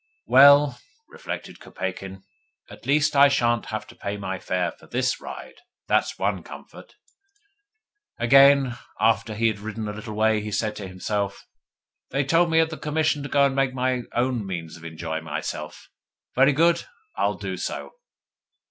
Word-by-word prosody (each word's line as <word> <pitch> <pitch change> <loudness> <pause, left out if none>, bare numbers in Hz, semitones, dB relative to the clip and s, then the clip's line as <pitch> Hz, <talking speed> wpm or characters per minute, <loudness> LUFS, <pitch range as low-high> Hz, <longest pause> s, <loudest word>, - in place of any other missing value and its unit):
'Well,' 140 0 +6 0.3
reflected - - -7
Kopeikin, 95 +1 -6 0.5
'at - - -13
least 145 +1 +2
I 140 +1 +8
shan't 120 -5 +1
have 110 -1 -4
to - - -15
pay 100 +1 -5
my 95 -2 -4
fare 90 -2 -1
for - - -19
THIS 125 +1 -1
ride. - - -9 0.3
That's - - +1
one - - -1
comfort.' - - -13 1.2
Again, 135 0 +5 0.2
after 110 0 +1
he 115 +2 -1
had 110 -3 +1
ridden 110 +1 -5
a 105 - -4
little 110 0 -7
way, 110 0 +2
he 105 0 -6
said 105 +1 -1
to 100 - -6
himself: 100 +2 -3 0.6
'they 140 +2 0
told 165 +5 +3
me 160 0 +3
at 160 0 +2
the 155 - -6
Commission 155 -1 0
to 140 - -6
go 140 -1 +4
and 135 -1 0
make 135 -1 +1
my 130 -1 0
own 120 -1 0
means 85 -4 -6
of 85 - -14
enjoying 80 -1 -5
myself. - - -6 0.5
Very 135 +3 +4
good. 170 +4 +3 0.3
I'll - - 0
do - - -5
so. - - -5
120 Hz, 165 wpm, -24 LUFS, 105-140 Hz, 1.2 s, I